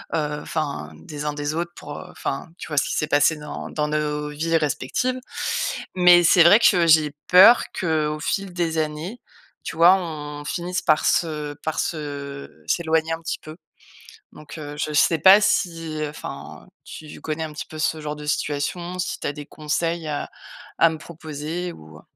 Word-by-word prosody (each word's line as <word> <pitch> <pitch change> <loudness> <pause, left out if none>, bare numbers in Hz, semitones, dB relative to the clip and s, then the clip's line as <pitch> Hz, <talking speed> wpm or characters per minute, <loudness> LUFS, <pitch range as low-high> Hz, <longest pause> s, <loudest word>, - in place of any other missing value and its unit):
heu, - - +2
heu 150 -1 -2
enfin 140 - -4
des 145 - -8
uns 150 - -1
des 145 +1 -3
autres 170 +1 -3
pour, 145 - -8
heu - - -9
enfin, 135 +4 -4
tu - - -7
vois, 150 - -4
ce - - +4
qui - - -2
s'est - - 0
passé 145 +2 +3
dans 150 0 -7
dans 150 -1 -1
nos 150 -1 -1
vies 165 +3 0
respectives. 160 - -1 0.8
Mais 180 -1 +7
c'est 170 +1 +6
vrai 170 +5 +8
que 180 -7 +4
j'ai 155 -2 +4
peur 195 +7 +8
qu'au 155 -4 0
fil 195 +5 -2
des 165 -2 -1
années, 155 +9 -4 0.4
tu - - -6
vois, 170 +2 +8
on 150 -5 -5
finisse 180 +3 -3
par 155 -2 +2
se 150 -3 0
par 160 0 -2
se 140 - -5
s'éloigner 160 -1 +1
un 165 - -5
petit 165 - -3
peu. 155 +1 -11 0.8
Donc, 150 +2 -11
heu, 145 -1 -7
je 155 0 -2
sais 160 +2 +4
pas 190 +4 +8
si 165 -6 0
enfin, 150 - -9
heu, - - -22 0.4
tu - - -11
connais 160 +1 -3
un 155 - -6
petit 150 - -6
peu 155 - -10
ce 155 0 0
genre 150 0 -5
de 150 0 -9
situation, 170 +5 -2
si 180 - -3
tu - - -4
as - - -2
des 145 -1 -8
conseils 160 +2 -2
à 145 -1 -3 0.5
à 165 - +6
me 160 - -6
proposer, 160 +2 -6
ou, 80 - -14
heu? - - -17
155 Hz, 190 wpm, -23 LUFS, 150-170 Hz, 0.8 s, vrai